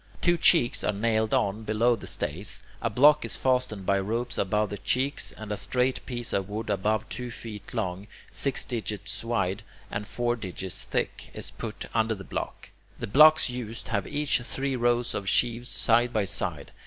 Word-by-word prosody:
Two 175 -1 +3
cheeks 165 -6 +4
are - - +2
nailed 110 +1 0
on 100 +3 +1
below 110 +3 +2
the 110 - -10
stays, 90 +8 -1 0.2
a - - 0
block 145 +7 +5
is - - 0
fastened 125 -7 0
by 100 +1 +2
ropes 115 +5 -2
above 105 +2 +1
the 100 - -5
cheeks, 135 +6 0
and 110 -1 -9
a - - 0
straight 125 +6 0
piece 120 -2 -3
of 100 0 -1
wood 105 +1 -3
about 105 +2 0
two 125 -1 -4
feet 110 -3 -8
long, 100 -3 -3 0.2
six 140 -2 +2
digits 110 -4 -3
wide, 100 -4 -1 0.3
and 100 0 -4
four 120 0 -1
digits 95 -4 -4
thick, - - -3
is - - -5
put - - -6
under 110 -1 +1
the 95 - -9
block. - - -6 0.3
The - - -4
blocks 155 +7 +7
used 120 -3 -6
have 100 -4 -1
each 145 -4 +1
three 135 +2 -2
rows 120 0 +1
of 100 -1 -2
sheaves 120 0 +2
side 120 +1 +2
by 110 -4 +1
side. 85 -6 -2
110 Hz, 180 wpm, -27 LUFS, 100-125 Hz, 0.3 s, blocks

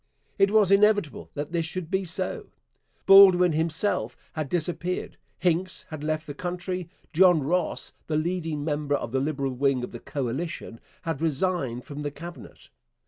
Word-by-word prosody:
It 195 0 +5
was 210 -2 +4
inevitable 205 -5 +3
that 145 +2 -4
this 165 -2 0
should 170 0 -5
be 190 0 0
so. 185 +2 -2 0.6
Baldwin 190 -3 +8
himself 160 - 0 0.2
had 155 -4 -3
disappeared. 175 +1 -2 0.2
Hincks 180 +1 0
had 155 -2 -6
left 155 0 -1
the 145 - -6
country. 180 +2 -4 0.2
John 175 -3 +5
Ross, 175 +4 -1
the 155 - 0
leading 160 -3 -2
member 145 -2 0
of 120 - -4
the 130 - +1
Liberal 140 -1 -1
wing 135 -1 +1
of - - -5
the 120 - -8
coalition, 140 -1 -4 0.2
had 160 -3 -3
resigned 155 -6 -1
from 145 0 -7
the 145 - -2
Cabinet. 170 +5 -11
160 Hz, 155 wpm, -26 LUFS, 145-180 Hz, 0.6 s, Baldwin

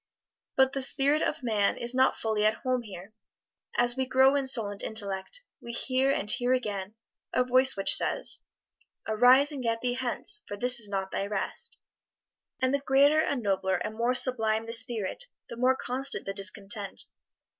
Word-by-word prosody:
But 265 0 +3
the 275 - -2
spirit 280 +3 +4
of - - -2
man 215 -4 0
is 235 +1 -1
not 260 +1 +3
fully 220 -2 -2
at 215 +1 +2
home 255 -1 0
here; 200 -2 -11 0.6
as 240 0 +3
we 260 -1 -2
grow 265 +1 +4
in 275 -2 0
soul 230 -5 +2
and 205 -1 -8
intellect, 205 - -2 0.2
we 235 - -8
hear, 260 +2 0
and 210 - -2
hear 245 +4 +2
again, 205 -5 -3 0.4
a 250 - +2
voice 255 0 +3
which 195 - +5
says, - - 0 0.7
"Arise 250 +6 +4
and 280 -3 -6
get 230 -1 -2
thee 245 -1 -1
hence, 260 - -3
for 205 - -6
this 245 +2 +2
is 210 -3 -1
not 195 -1 -3
thy 195 - -3
rest." 205 -1 -3 0.8
And 260 +1 0
the 280 - +1
greater 280 +2 +3
and 275 -6 -2
nobler 190 -1 0
and 210 +4 -4
more 235 +3 0
sublime 225 -4 +3
the 230 - -4
spirit, 240 - 0 0.2
the - - -7
more 255 +2 +2
constant 260 +2 -1
the 195 - -3
discontent. 200 +1 -1
240 Hz, 180 wpm, -28 LUFS, 210-260 Hz, 0.8 s, which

